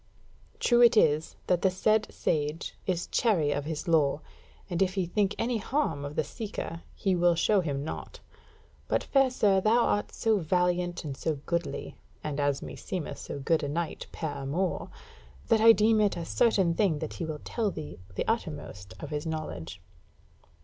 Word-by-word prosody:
True 240 -1 +4
it 240 -1 +7
is 155 -4 +3
that 180 -1 +2
the 190 - +4
said 215 +4 +1
sage 150 +2 -1
is 180 -2 0
chary 180 -11 +2
of 145 0 -2
his 155 +1 -4
lore, 155 -3 +3 0.5
and 175 -2 -2
if 185 0 +2
he 190 -2 +1
think 200 +3 0
any 235 0 0
harm 210 - -1
of 145 +1 -6
the - - +1
seeker, 205 -7 -6
he 190 -2 +1
will 175 0 +4
show 195 +4 +3
him 140 -4 -2
naught; 155 - -6 0.7
but, - - +1
fair 270 -1 +3
sir, 200 -6 +3
thou 225 +4 +4
art 205 - 0
so 220 -3 +1
valiant 180 +1 0
and 140 -3 -4
so 155 +3 -1
goodly, 170 0 -3 0.3
and 150 -1 -3
as 145 -1 0
meseemeth 180 -5 -5
so - - -6
good 155 +4 +1
a 145 - -2
knight 165 +2 -3
per 160 -2 -3
amours, 145 +7 -2 0.6
that 220 - +4
I 225 +1 +9
deem 220 0 +4
it 205 -4 +2
a 170 - -4
certain 195 -5 +3
thing 180 -4 +2
that 155 +1 -5
he 170 - -4
will 155 -2 -5
tell 225 -3 -1
thee 155 - -7 0.2
the - - -2
uttermost 145 - -3
of 150 - -7
his 150 +2 -3
knowledge." 155 - -5
175 Hz, 180 wpm, -29 LUFS, 150-210 Hz, 0.7 s, I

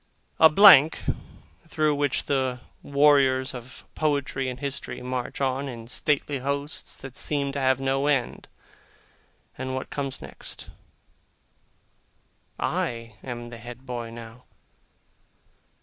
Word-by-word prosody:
A 160 - +9
blank, 160 -4 +8 0.6
through 155 -1 +1
which 145 -2 0
the 130 -3 0 0.2
warriors 140 -2 +3
of 125 +1 -10
poetry 140 -3 0
and 125 0 -6
history 140 -1 -4
march 125 -1 -4
on 135 0 -1
in 115 -2 -8
stately 145 +2 0
hosts 140 +3 -3
that 135 -1 -10
seem 140 -2 -1
to 140 - -3
have 130 -1 +2
no 135 +1 0
end 135 -5 0 1.1
and 130 0 -3
what 130 - -5
comes 135 -2 -3
next! - - -8 1.9
I 115 -3 -2
am 120 -2 -6
the 115 - -8
head 120 +3 -10
boy, 120 -2 -5
now! 115 +1 -11
135 Hz, 120 wpm, -26 LUFS, 125-140 Hz, 1.9 s, A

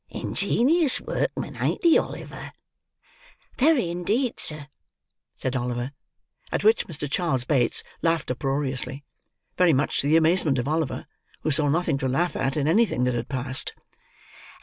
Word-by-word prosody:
Ingenious 295 +4 +1
workman, - - -3
ain't - - -1
he, 335 -2 +6
Oliver?" - - -3 1.1
"Very 265 - +3
indeed, 210 +9 -1
sir," 155 -2 +2 0.7
said 130 0 -3
Oliver. 120 +1 -2 0.6
At - - -1
which 220 +2 +3
Mr. 150 -3 -4
Charles 140 -5 0
Bates 125 -3 +1 0.2
laughed 165 -4 0
uproariously; 135 0 -2 0.6
very 180 -3 +5
much 140 +2 +1
to 140 - 0
the 155 +2 +5
amazement 160 -3 +3
of 120 +1 -2
Oliver, 155 -1 -1 0.4
who 155 - +1
saw 145 0 +2
nothing 155 -2 +1
to 130 - -1
laugh 165 +7 0
at, 135 +2 -1
in 145 -1 0
anything 195 - +2
that 125 0 +1
had 120 -1 -3
passed. 130 0 -1
150 Hz, 145 wpm, -25 LUFS, 130-175 Hz, 1.1 s, he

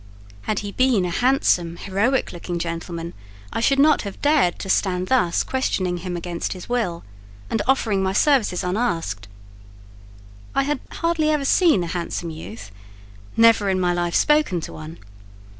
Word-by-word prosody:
Had 215 - 0
he 200 - -4
been 250 -5 +2
a 175 - -2
handsome, 180 -8 +2
heroic 215 +9 0
looking 175 0 -5
young - - -2
gentleman, 170 0 -5 0.4
I - - -1
should 275 +4 +2
not 300 +2 +5
have 200 -2 -7
dared 290 - +2
to - - -7
stand 185 -1 0
thus 210 -10 +2
questioning 185 -9 -1
him 175 0 -4
against 170 0 -4
his 180 -2 -10
will, 225 -9 -2 0.5
and 225 - 0
offering 225 -7 +2
my 190 0 0
services 220 -8 +2
unasked. 170 - -2 1.3
I 275 - +3
had 290 0 -1
hardly 335 -2 0
ever 300 -2 +1
seen 315 - +4
a - - -3
handsome 170 -1 -4
youth; 115 -9 -9 0.7
never 225 -3 +5
in 190 -1 +1
my 180 -1 +1
life 175 -1 -1
spoken 300 - +3
to - - -7
one. 155 +2 -9
190 Hz, 160 wpm, -22 LUFS, 175-260 Hz, 1.3 s, not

